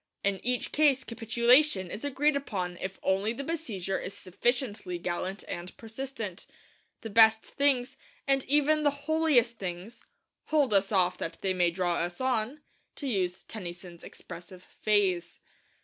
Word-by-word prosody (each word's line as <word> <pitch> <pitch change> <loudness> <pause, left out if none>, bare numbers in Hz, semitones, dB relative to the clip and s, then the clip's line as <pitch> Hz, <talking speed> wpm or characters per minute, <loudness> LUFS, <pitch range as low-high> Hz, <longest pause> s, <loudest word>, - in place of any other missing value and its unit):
In 200 -1 -1
each 250 0 0
case 285 -4 +3
capitulation 235 - +3
is 210 - -6
agreed 285 +1 +1
upon 185 -10 -3
if 190 +1 -5
only 195 +4 +1
the 275 - -5
besieger 225 - -3
is 185 - -7
sufficiently 205 -2 -1
gallant 185 +3 -3
and 175 +1 -6
persistent. 225 -4 -6 0.5
The 225 - -7
best 220 +1 +6
things, 275 -3 +1 0.3
and 270 -1 +3
even 295 +2 +3
the 295 - +4 0.2
holiest 290 -8 +3
things, 185 +5 -6 0.4
'hold 290 -7 +2
us 195 +1 +3
off 180 -2 +2
that 165 - -4
they 190 -1 +1
may 180 -1 +3
draw 175 0 -1
us 175 +1 -3
on' 260 +2 -1 0.3
to 285 - -6
use 190 -7 -1
Tennyson's 175 -4 -8
expressive 180 +1 -11 0.2
phrase. 190 -5 +1
215 Hz, 145 wpm, -29 LUFS, 185-265 Hz, 0.5 s, best